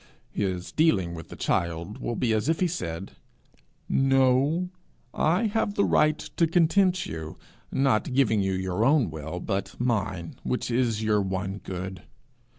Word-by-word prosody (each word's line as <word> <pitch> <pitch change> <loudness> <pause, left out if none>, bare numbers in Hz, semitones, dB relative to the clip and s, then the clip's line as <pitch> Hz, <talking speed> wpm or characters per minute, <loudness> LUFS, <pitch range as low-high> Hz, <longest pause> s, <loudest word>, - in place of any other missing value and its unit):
his 95 -3 -2
dealing 100 - +2
with 80 -2 -9
that - - -9
child 85 +4 -1
will 120 - -3
be 115 -2 +1
as 110 +6 0
if 160 - +1
he 185 - +3
said 95 - -4 0.8
'No; 135 +6 +3 0.4
I 175 +9 +2
have 210 -1 0
the 200 - +3
right 155 0 +3 0.2
to 165 - +4
content 180 +2 +3
you, 80 -1 -6 0.3
not 130 -5 +1
giving 110 -6 +3
you 95 0 0
your 95 +2 -1
own 135 - +3
will 80 +3 -5
but 100 +1 -3
mine, 100 -8 -1
which 125 - -2
is 115 -3 +1
your 105 -1 +2
one 95 +1 -3
good. 95 -1 -6
110 Hz, 155 wpm, -26 LUFS, 95-150 Hz, 0.8 s, to